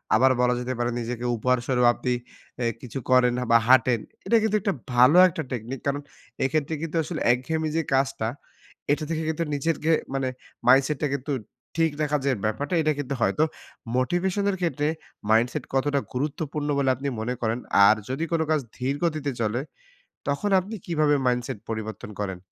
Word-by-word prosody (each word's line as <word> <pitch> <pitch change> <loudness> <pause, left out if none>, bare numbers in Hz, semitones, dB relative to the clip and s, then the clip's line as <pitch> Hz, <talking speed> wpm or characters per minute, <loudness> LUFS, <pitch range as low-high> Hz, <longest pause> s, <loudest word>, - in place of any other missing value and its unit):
আবার 130 +1 +5
বলা 125 0 +3
যেতে 125 +1 -3
পারে 120 0 0
নিজেকে 120 +1 -4
উপহারস্বরূপ 125 +1 +1
আপনি 125 - -3 0.5
এ - - +1 0.2
কিছু 125 +1 -6
করেন 125 -1 +5 0.2
বা 115 - +8
হাঁটেন। 125 -2 +5 0.3
এটা 230 - +4
কিন্তু 215 -1 +1
একটা 200 +1 0 0.2
ভালো 125 +7 +6
একটা 160 -1 -4
টেকনিক। 125 +2 -4
কারণ 145 +1 0 0.4
এক্ষেত্রে 150 +3 0
কিন্তু 165 0 -4
আসলে 155 +1 -4
একঘেয়েমি 155 +5 -2
যে - - +3
কাজটা, 135 -4 +1 0.6
এটা 150 +1 +1
থেকে 160 -1 -1
কিন্তু 160 +1 -1
নিজেরকে 155 +2 0 0.2
মানে 135 -1 0 0.4
মাইন্ডসেটটা 135 +3 +4
কিন্তু 140 +1 -3 0.5
ঠিক 165 -1 +3
রাখার 150 -1 +1
যে 140 - +3
ব্যাপারটা 140 +10 -1
এটা 155 - +2
কিন্তু 140 -1 -3
হয়। 95 - +3
তো - - +6 0.5
মোটিভেশন 175 +9 0
এর 195 - 0
ক্ষেত্রে 150 -4 0 0.4
মাইন্ডসেট 115 +2 +2
কতটা 140 +1 +2
গুরুত্বপূর্ণ 150 +2 -2
বলে 140 -1 +2
আপনি 135 +3 -5
মনে 120 +3 -2
করেন? 115 +1 0 0.3
আর 105 - +6
যদি 135 +5 -2
কোনো 165 -1 +2
কাজ 155 - +3 0.2
ধীর 130 +3 -1
গতিতে 155 -4 0
চলে 115 +3 0 0.7
তখন 140 +9 0
আপনি 200 +5 -7
কিভাবে 155 -3 +2
মাইন্ডসেট 125 -3 0
পরিবর্তন 110 -2 -5
করেন? 95 -3 -3
135 Hz, 170 wpm, -25 LUFS, 125-155 Hz, 0.7 s, বা